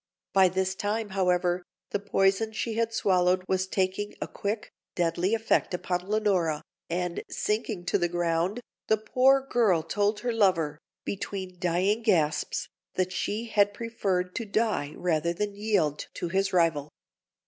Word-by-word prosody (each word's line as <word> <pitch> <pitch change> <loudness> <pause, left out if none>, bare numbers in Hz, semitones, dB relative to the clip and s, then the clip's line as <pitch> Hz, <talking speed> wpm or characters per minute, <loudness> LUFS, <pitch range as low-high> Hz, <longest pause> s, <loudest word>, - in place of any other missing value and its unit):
By 190 -1 +6
this 190 +1 0
time, 210 +2 -2
however, 180 -2 +1 0.3
the 205 - 0
poison 195 +2 +1
she 225 +1 -2
had 230 0 0
swallowed 185 -4 +2
was 190 0 0
taking 190 +2 -1
a - - -3
quick, 210 +2 -4 0.2
deadly 175 +4 +1
effect 225 -4 +1
upon 180 +1 -3
Leonora, 190 -8 +1 0.3
and, 175 0 -2
sinking 210 -4 -2
to 180 - +1
the 175 - +2
ground, 175 +5 0 0.3
the 220 - +4
poor 260 +5 +3
girl 210 -11 +3
told 205 +4 0
her 240 -1 -1
lover, 165 -9 +2 0.3
between 190 -2 -5
dying 185 +5 +1
gasps, 165 -9 +1 0.3
that 185 0 0
she 210 +5 -2
had 205 -2 +2
preferred 190 -6 -1
to 230 - -2
die 200 -9 0
rather 170 -1 0
than 205 +3 -2
yield 200 -8 0
to 175 - -3
his 195 +2 +1
rival. 165 -5 +2
190 Hz, 150 wpm, -28 LUFS, 175-210 Hz, 0.3 s, By